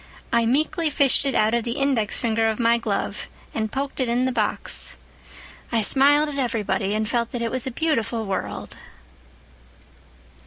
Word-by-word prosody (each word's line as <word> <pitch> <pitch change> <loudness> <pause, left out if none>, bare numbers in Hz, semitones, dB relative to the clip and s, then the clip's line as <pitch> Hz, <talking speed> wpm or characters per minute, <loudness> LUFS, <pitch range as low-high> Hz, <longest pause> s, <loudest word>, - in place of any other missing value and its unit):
I 235 -1 +3
meekly 310 +5 +1
fished 280 -1 +2
it 270 - -1
out 215 +1 +3
of 235 -1 +1
the 235 - -2
index 270 -7 +1
finger 225 -1 +1
of 220 -1 0
my 235 0 +3
glove 210 -2 -3 0.3
and 220 -1 -2
poked 275 +1 -3
it 255 -2 0
in 245 +2 +1
the 260 - +1
box. - - 0 0.7
I 230 -2 +2
smiled 290 +6 +4
at 280 -1 -4
everybody 210 -5 -1
and 215 0 0
felt 235 +1 -1
that 245 - -3
it 230 - -1
was 255 0 -1
a - - -2
beautiful 235 -6 -1
world." 195 - -4
235 Hz, 170 wpm, -23 LUFS, 220-270 Hz, 0.7 s, smiled